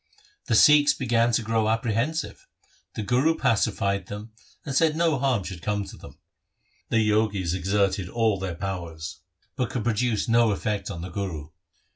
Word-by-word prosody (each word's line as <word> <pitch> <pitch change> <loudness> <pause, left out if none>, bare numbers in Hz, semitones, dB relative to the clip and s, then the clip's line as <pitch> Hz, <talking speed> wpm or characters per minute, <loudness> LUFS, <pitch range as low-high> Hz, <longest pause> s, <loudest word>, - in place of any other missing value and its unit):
The - - +1
Sikhs 150 -1 +6
began 120 -2 +1
to 115 - +2
grow 110 0 +1
apprehensive. 115 +8 -1 0.5
The 110 - -3
Guru 130 +9 +2
pacified 100 -3 0
them, 105 +2 -8 0.3
and 140 - -4
said 155 +2 +3
no 165 -4 +1
harm 125 -6 +1
should 90 -3 -7
come 105 +1 -1
to - - -10
them. - - -13 0.7
The 110 -2 +2
Jogis 105 -5 +1
exerted 95 0 0
all 110 -3 +1
their 95 -3 -4
powers, 85 -3 -6 0.4
but 125 -4 -1
could 125 - -3
produce 115 -1 0
no 115 0 +4
effect 105 0 -2
on 85 - -6
the 90 - -6
Guru. 85 -6 -5
110 Hz, 160 wpm, -25 LUFS, 95-120 Hz, 0.7 s, Sikhs